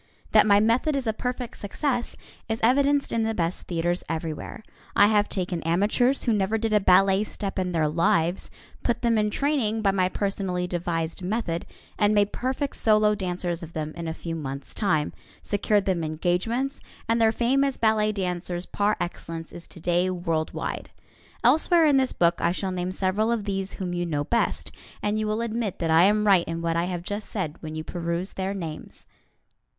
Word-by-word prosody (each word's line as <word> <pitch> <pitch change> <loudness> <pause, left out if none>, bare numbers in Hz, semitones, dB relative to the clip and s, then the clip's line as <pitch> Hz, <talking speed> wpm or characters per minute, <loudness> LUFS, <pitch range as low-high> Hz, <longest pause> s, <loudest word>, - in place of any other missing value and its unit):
That - - +6
my 200 -1 +6
method 235 +8 +2
is 270 -2 -1
a 220 - +1
perfect 250 +1 -4
success 245 +4 -2 0.3
is 225 0 -1
evidenced 280 +4 +3
in 230 - +1
the 220 0 0
best 170 -1 -2
theatres 175 +1 -1
everywhere. 160 +5 -4 0.3
I 205 - +7
have 210 0 +3
taken 180 -3 -2
amateurs 205 - +2
who 235 - +2
never 205 +1 +1
did 225 0 -1
a 210 - +5
ballet 195 +1 +4
step 200 -2 -4
in 180 -1 -1
their 160 -3 +1
lives, 165 +2 +1 0.3
put 240 0 -1
them 230 -2 +3
in 210 0 +1
training 225 -4 0
by 195 - +4
my 185 -1 +1
personally 190 -3 -2
devised 170 -1 -2
method, 180 -3 -2 0.3
and 210 0 +3
made 205 0 +2
perfect 265 +2 -2
solo 215 -1 +4
dancers 180 -3 -3
of 165 -1 -9
them 155 -1 -4
in 170 -1 -5
a 160 - -2
few 165 - -5
months' 140 -3 -6
time, 160 -8 0 0.3
secured 205 0 +1
them 180 -4 0
engagements, 180 - -1 0.3
and 230 +1 +2
their 220 -1 +5
fame 250 +4 +2
as 275 -1 0
ballet 215 -1 +2
dancers 180 -2 -3
par 205 +1 0
excellence 165 -2 -5
is 170 - -10
today 175 +2 0
world 165 -3 -1
wide. - - -4 0.5
Elsewhere 330 +1 +5
in 290 -3 +5
this 260 -1 +2
book 170 0 +2
I 170 - +2
shall 190 +1 -2
name 180 0 -2
several 195 +4 0
of 230 -3 0
these 195 -1 -2
whom 180 -2 -4
you 175 0 -1
know 145 -3 -1
best, 235 +10 -1 0.3
and 210 +1 0
you 215 - -1
will 215 +2 -1
admit 230 -3 -2
that 165 -2 -1
I 165 +3 +6
am 210 +1 +3
right 190 -4 +4
in 165 0 -4
what 165 0 0
I 170 +1 +1
have 180 -1 -4
just 205 +3 -5
said 170 -8 -3
when 155 -1 -6
you 155 - -4
peruse 170 +2 -3
their 190 +1 -3
names. 165 -5 -7
195 Hz, 195 wpm, -25 LUFS, 170-220 Hz, 0.5 s, I